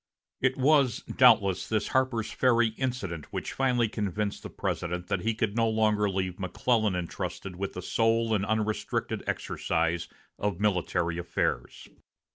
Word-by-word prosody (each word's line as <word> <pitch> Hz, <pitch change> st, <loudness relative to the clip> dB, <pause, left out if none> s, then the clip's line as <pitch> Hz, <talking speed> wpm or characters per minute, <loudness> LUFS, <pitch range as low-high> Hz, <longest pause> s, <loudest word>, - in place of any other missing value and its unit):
It 130 Hz, 0 st, +2 dB
was 140 Hz, -3 st, +3 dB
doubtless 110 Hz, -7 st, +5 dB
this 110 Hz, -1 st, 0 dB
Harper's 130 Hz, -4 st, 0 dB
Ferry 120 Hz, -2 st, +3 dB
incident 110 Hz, -, -4 dB
which -, -, -4 dB
finally 125 Hz, -3 st, +2 dB
convinced 105 Hz, -1 st, -2 dB
the -, -, -7 dB
President 90 Hz, +1 st, -3 dB
that 100 Hz, -2 st, +1 dB
he 115 Hz, +2 st, 0 dB
could 110 Hz, -2 st, -1 dB
no 115 Hz, -1 st, +2 dB
longer 105 Hz, -2 st, +2 dB
leave 95 Hz, -2 st, -2 dB
McClellan 105 Hz, +2 st, +1 dB
intrusted 90 Hz, +1 st, -4 dB
with 100 Hz, +2 st, -4 dB
the 90 Hz, -, -6 dB
sole 115 Hz, +2 st, +2 dB
and 100 Hz, -2 st, +1 dB
unrestricted 110 Hz, 0 st, -1 dB
exercise 85 Hz, +1 st, -1 dB, 0.3 s
of 100 Hz, -3 st, -1 dB
military 90 Hz, -4 st, 0 dB
affairs. 85 Hz, -7 st, -2 dB
105 Hz, 140 wpm, -28 LUFS, 95-115 Hz, 0.3 s, doubtless